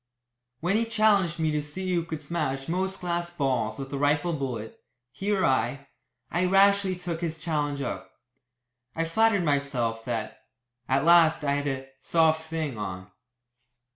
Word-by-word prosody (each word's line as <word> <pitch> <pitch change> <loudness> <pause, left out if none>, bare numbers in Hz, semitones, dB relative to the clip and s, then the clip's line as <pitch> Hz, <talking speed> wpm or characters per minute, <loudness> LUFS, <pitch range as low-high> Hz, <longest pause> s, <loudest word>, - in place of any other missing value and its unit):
When 180 +5 +2
he 230 - +1
challenged 210 -6 +3
me 160 -1 +1
to 150 0 0
see 185 +5 -4
who 170 -1 +1
could 160 -2 -6
smash 140 -4 -2
most 190 +3 -2
glass 175 -1 -2
balls 130 -9 -1
with 135 0 -7
a 140 - -2
rifle 145 +4 +2
bullet, 125 -7 -4 0.3
he 200 +8 -3
or 195 -2 +2
I, 135 +2 0 0.4
I 175 +2 +1
rashly 195 0 +4
took 175 -2 -5
his 165 -2 -2
challenge 150 -3 -2
up. 130 - -4 0.9
I 165 - 0
flattered 200 +3 +2
myself 140 -7 0
that, - - -4 0.5
at 135 +3 +2
last, 165 -2 +5
I 140 - +1
had 145 0 0
a 135 -1 -3
"soft 160 +1 +2
thing" 155 -8 -3
on. 95 -2 -6
160 Hz, 160 wpm, -27 LUFS, 140-175 Hz, 0.9 s, last